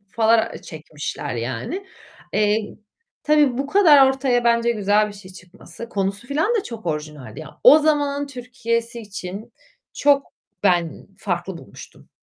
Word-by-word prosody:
falan 225 0 +3
çekmişler, 150 -3 -6
yani. 125 - -4 0.5
Eee, 210 0 +2 0.7
tabii, 295 -4 +3
bu 275 - -1
kadar 295 -5 +6
ortaya 265 -2 0
bence 235 0 +3
güzel 210 0 +2
bir 210 - -9
şey 195 -2 -13
çıkması. 185 +3 -12
Konusu 200 +1 -3
filan 320 +12 +1
da 440 - +1
çok 225 -5 -9
orijinaldi 150 -3 -5
ya. 155 -1 -13
O 300 - +9
zamanın 290 -2 0
Türkiye'si 235 -3 -4
için 200 -1 -8 0.4
çok 280 -1 +2 0.4
ben 175 -4 +1
farklı 180 -1 -3
bulmuştum. 100 - -14
225 Hz, 135 wpm, -21 LUFS, 180-275 Hz, 0.7 s, O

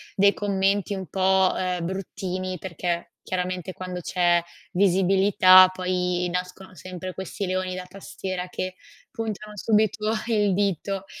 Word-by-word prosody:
dei 200 +1 +5
commenti 200 0 0
un 190 -1 -5
po', 190 0 +3
uhm, 180 -2 -2
bruttini 185 0 -4
perché, 170 -1 -3
chiaramente 185 0 -3
quando 180 -1 -6
c'è 175 -1 +2 0.3
visibilità 185 0 +6
poi 180 -1 -1
nascono 180 +1 -5
sempre 185 +2 -7
questi 190 +1 -4
leoni 185 0 -1
da 185 0 -5
tastiera 185 -1 -6
che 185 0 -4 0.3
puntano 215 -3 -5
subito 215 0 +1 0.2
il 210 -4 +2
dito. 195 0 -1
185 Hz, 125 wpm, -25 LUFS, 180-195 Hz, 0.3 s, visibilità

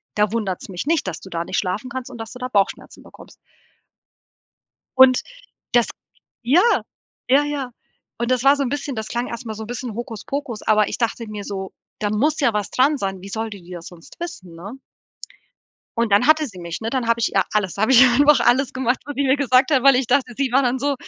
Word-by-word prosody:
da 210 -1 +2
wundert's 200 -6 -3
mich 180 +3 -5
nicht, 320 -8 +1
dass 170 -4 -4
du 190 - -11
da 170 -1 -3
nicht - - -1
schlafen 195 +7 -3
kannst 260 -2 -6
und 245 - -9
dass 225 0 -7
du 250 - -11
da 250 - -3
Bauchschmerzen 200 -5 -1
bekommst.“ - - -15 1.6
Und 260 -1 +7 0.5
das 240 -2 +4 0.6
Ja 275 +9 +4 0.7
ja 275 +3 +5
ja. 285 -4 -4 0.5
Und 235 0 -1
das 255 -1 +1
war 275 +1 +6
so 285 - -1
'n 255 - -2
bisschen 285 -1 -4
das 220 -1 -4
klang 240 +2 -3
erst 235 +1 -7
mal 220 - -4
so 220 - -7
'n - - -10
bisschen 245 -2 -5
Hokuspokus, 240 +2 -5
aber 215 -1 +3
ich - - -4
dachte 230 -1 -2
mir 210 -1 -6
so: 190 -2 -6 0.3
„Da 210 - -1
muss 280 +9 +1
ja 260 -6 +2
was 210 -2 -2
dran 280 +4 +3
sein. 195 -5 -4
Wie 195 - -9
soll 220 +2 -3
die 200 -3 -10
die 175 - -14
das 175 -2 -8
sonst 175 - -15
wissen, 185 - -8
ne?“ 200 +10 -9 1.2
Und 230 -2 0
dann 205 +5 +4
hatte 310 0 +4
sie 200 -8 -11
mich, 170 -1 -6
ne? 225 0 -3
Dann 255 -2 -1
habe 230 0 +1
ich 225 - 0
ihr - - +4
alles, 205 -4 0
dann 200 - -3
habe 220 - +3
ich 245 - +8
ihr 255 - +6
einfach 285 +2 +5
alles 260 +3 +2
gemacht, 255 -1 0
wo 290 - -4
die 280 0 -1
mir 265 +1 +3
gesagt 265 0 +3
hat 270 -4 +3
weil 275 -1 +6
ich 255 0 0
dachte, 250 0 +1
sie 275 -2 0
war 270 +2 +4
dann 250 0 0
so 285 +2 0
240 Hz, 240 wpm, -21 LUFS, 210-270 Hz, 1.6 s, ich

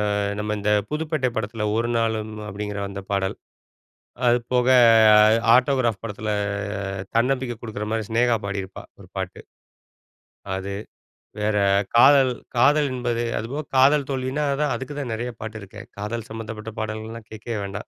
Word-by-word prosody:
அ - - 0 0.2
நம்ம 105 0 -2
இந்த 105 +1 0 0.2
புதுப்பேட்டை 155 -4 -1
படத்துல 110 0 -2
"ஒரு 115 +1 0
நாளும்" 110 -1 -1 0.2
அப்டிங்கிற 105 0 -5
அந்த 100 0 -6
பாடல். 95 -1 0 0.9
அது 120 +1 +5 0.2
போக 125 0 +3 0.9
"ஆட்டோகிராப்" 125 -5 +2
படத்துல 105 0 -4 0.8
தன்னம்பிக்கை 125 -1 +1
குடுக்குற 105 -2 -5
மாரி 110 -2 -1
சினேகா 115 0 +2
பாடிருப்பா 95 -1 -5 0.2
1 - - -13
பாட்டு. - - -4 1.2
அது. 100 +1 -5 0.6
வேற 105 0 +1 0.4
காதல் 135 +1 +7 0.2
காதல் 145 +4 +4
என்பது 120 -2 -1 0.2
அதுபோக 135 +8 -4
காதல் 140 +2 +5
தோல்வினா 130 +2 -2 0.2
தான் 145 -2 +1
அதுக்கு 135 +2 -6
தான் 125 -5 -4
நெறைய 120 +2 -3
பாட்டு 110 0 -6
இருக்கே. 100 - -10 0.2
காதல் 110 +2 -4
சம்பந்தப்பட்ட 110 -1 -7
பாடல்கள்லாம் 110 +1 -6
கேட்கவே 110 0 -5
வேண்டாம். 100 0 -6
115 Hz, 135 wpm, -23 LUFS, 105-130 Hz, 1.2 s, காதல்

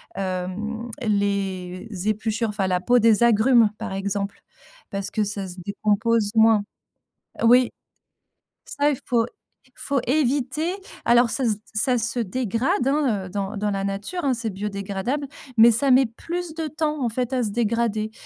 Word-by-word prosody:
hem, 195 +5 -4
les 200 -3 -1 0.2
épluchures, 220 +1 -1
enfin 200 -2 -1
la 180 -1 0
peau 245 +3 +4
des 225 0 +4
agrumes, 230 0 +5
par 225 -3 -5
exemple, 200 +1 -3 0.5
parce 195 -1 -3
que 215 - 0
ça 200 -1 -2
se 180 - -8
décompose 210 +1 +1
moins. 220 -2 +5 0.8
Oui. 245 +1 +5 1.1
Ça, 290 +1 +4
il 285 - -1
faut 235 -2 +2 0.5
faut 280 -3 -1
éviter. 285 +4 +1 0.3
Alors 240 0 +5
ça 260 +2 0
se 220 - +3
d 205 - -9
ça 245 +4 +3
se 230 +1 +1
dégrade, 235 +3 -1
hein, 270 -9 +1
heu, - - -10
dans 200 +2 -3
dans 205 0 -1
la 195 0 -2
nature, 205 - -3
hein, 270 - +3
c'est 230 -2 -3
biodégradable, 200 +6 -3 0.3
mais 230 +1 +8
ça 270 +5 +2
met 260 +1 +6
plus 335 +9 -5
de 320 0 -3
temps, 305 -1 -2
en 240 - +1
fait, 250 +2 -2
à 255 -2 0
se 215 - -1
dégrader, 220 -1 -1
225 Hz, 160 wpm, -23 LUFS, 200-250 Hz, 1.1 s, mais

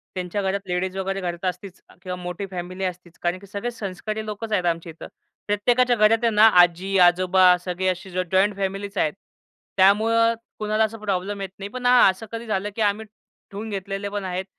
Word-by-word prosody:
त्यांच्या 185 +2 -3
घरात 195 +1 -1
लेडीज 185 +1 -2
वगैरे 195 0 -2
घरात 175 0 -4
असतीच 180 +1 -5 0.2
किंवा 180 -1 -5
मोठी 180 +3 -4
फॅमिली 185 +1 -5
असतीच. 180 -1 -7
कारण 175 +1 -1
की 200 - -14
सगळे 205 +5 -4
संस्कारी 215 0 -5
लोकंच 215 +1 -6
आहेत 185 -4 +1
आमच्या 165 -1 -1
इथं. 160 - -11 0.4
प्रत्येकाच्या 240 +4 +2
घरात 215 +1 +4
आहे 230 - +4
ना, 215 +1 +8
आजी-आजोबा 180 +1 +4
सगळे 185 +1 -2
असे 185 +1 -2
ज 185 - -7
जॉइंट 195 +2 +3
फॅमिलीच 195 +1 -4
आहेत. 155 - +1 0.6
त्यामुळं 225 +4 +4 0.3
कुणाला 215 +1 +1
असा 220 +1 -2
प्रॉब्लेम 200 -1 -3
येत 195 - -4
नाही. 200 +1 -6
पण 250 +2 -7
हा 250 0 +6
असं 190 +4 -4
कधी 230 0 -6
झालं, 205 -1 -1
की 225 - -3
आम्ही, 210 +1 +1 0.5
ठेवून 210 +3 -6
घेतलेले 195 0 -4
पण 205 0 -4
आहेत, 185 +1 -3
195 Hz, 190 wpm, -23 LUFS, 185-210 Hz, 0.6 s, ना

